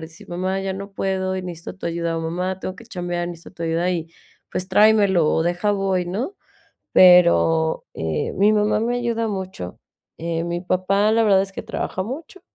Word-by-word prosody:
decir: 160 +1 -12
"Mamá, 185 +2 -2
ya 195 -1 -3
no 200 +1 -8
puedo, 190 -1 -1
y 185 - -5
necesito 175 -2 -7
tu 190 - -6
ayuda". 170 -1 -2
O, - - -3
"Mamá, 180 +3 -3
tengo 185 - -5
que 235 - -13
chambear. 175 -4 -3
Necesito 170 0 -10
tu 170 - -7
ayuda". 165 +2 0
Y, 165 -2 -2 0.4
pues, 185 +1 -3
tráemelo, 200 -4 +4
o 160 - +2
deja, 175 +5 0
voy, 195 -2 0
¿no? 230 - -3 0.6
Pero, 170 -3 +5
eh, 80 -1 -2
mi 205 +2 +4
mamá 210 +1 +2
me 240 +2 0
ayuda 230 -2 -1
mucho. 190 - -5 0.4
Eh, 165 0 -2
mi 175 +1 -3
papá, 195 +4 +2
la 225 0 +3
verdad, 195 -2 +5
es 195 - -6
que - - -6
trabaja 185 - -3
mucho. 290 - -7
185 Hz, 190 wpm, -22 LUFS, 170-200 Hz, 0.6 s, Pero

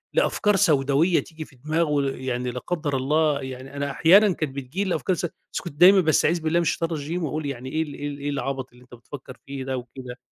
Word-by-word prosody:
لأفكار 210 -1 +2
سوداويّة 155 -2 +3
تيجي 160 -1 -8
في 135 - -20
دماغه 150 +2 0
ل 135 -2 -3
يعني 125 -1 -2
لا 125 - -5
قدّر 155 -2 -3
الله 150 +2 +1
يعني 130 +1 -8
أنا 140 0 -2
أحيانًا 190 +8 +5
كانت 150 -5 -4
بتيجي 140 +8 -3
لي - - -3
الأفكار 185 +1 0
الس 175 - -3
بس 170 - -7
كنت 175 - -8
دايمًا 190 +2 +9
بأستعيذ 160 +1 +2
بالله 160 +2 +1
من - - +1
الشيطان 165 0 -1
الرجيم 160 +3 -3
وأقول 155 0 -3
يعني 130 -2 -5
إيه 160 - 0
ال 150 -2 -9
إيه 145 +1 -5
ال 145 -1 -5
إيه 145 +1 -3
العَبَط 135 -2 -3
اللي 125 0 -18
أنت 125 - -20
بتفكّر 130 +1 -11
فيه 135 -1 -5
ده؟! 130 -1 -2
وكده. 125 0 -9
145 Hz, 235 wpm, -24 LUFS, 130-165 Hz, -, دايمًا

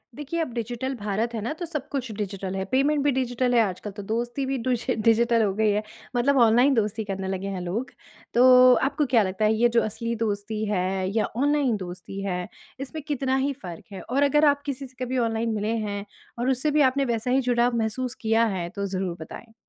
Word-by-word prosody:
देखिए, 295 +3 -4
अब 310 -7 -3
डिजिटल 240 +3 -3
भारत 215 +1 -2
है 225 - -3
ना, 235 +7 -2
तो 345 +2 -6
सब 300 -4 -5
कुछ 260 -5 -3
डिजिटल 195 -2 -4
है। 190 0 -2
पेमेंट 280 +2 +2
भी 290 - +3
डिजिटल 250 -1 0
है। 235 - +6
आजकल 205 0 -3
तो 205 +1 -8
दोस्ती 240 +5 -2
भी 270 0 -1
डूजि 250 +1 -1
डिजिटल 230 +1 +3
हो 200 -2 +1
गई 215 +1 +2
है, 210 +1 0 0.3
मतलब 270 +3 +3
ऑनलाइन 240 +4 +5
दोस्ती 220 -2 0
करने 195 -1 -4
लगे 190 +1 -3
हैं 180 - -4
लोग। 195 +9 -3 0.4
तो 255 +1 +7
आपको 280 +3 +1
क्या 240 -5 +3
लगता 190 +2 -1
है, 215 - +4
ये 235 +2 +3
जो 235 0 +3
असली 230 +2 -3
दोस्ती 215 -1 -2
है 190 -1 0
या 220 - +3
ऑनलाइन 285 -3 +2
दोस्ती 185 +1 -7
है, 180 -2 -2 0.3
इसमें 280 +4 -6
कितना 270 -3 0
ही 275 +1 0
फ़र्क 180 -11 -9
है 195 - -7
और 275 +3 0
अगर 295 +2 +4
आप 285 -1 +3
किसी 275 -1 -4
से 255 0 -8
कभी 255 +1 -2
ऑनलाइन 230 -1 0
मिले 215 +2 -1
हैं 205 0 -4 0.3
और 245 +2 +1
उससे 265 +4 +1
भी 300 +1 +3
आपने 275 0 +3
वैसा 235 0 -1
ही 260 - +4
जुड़ाव 245 -1 +2
महसूस 235 +3 -2
किया 225 +1 +3
है। 190 -6 -2
तो 200 +1 -4
ज़रूर 185 -2 -3
बताएँ? 225 +8 -10
235 Hz, 220 wpm, -25 LUFS, 205-260 Hz, 0.4 s, तो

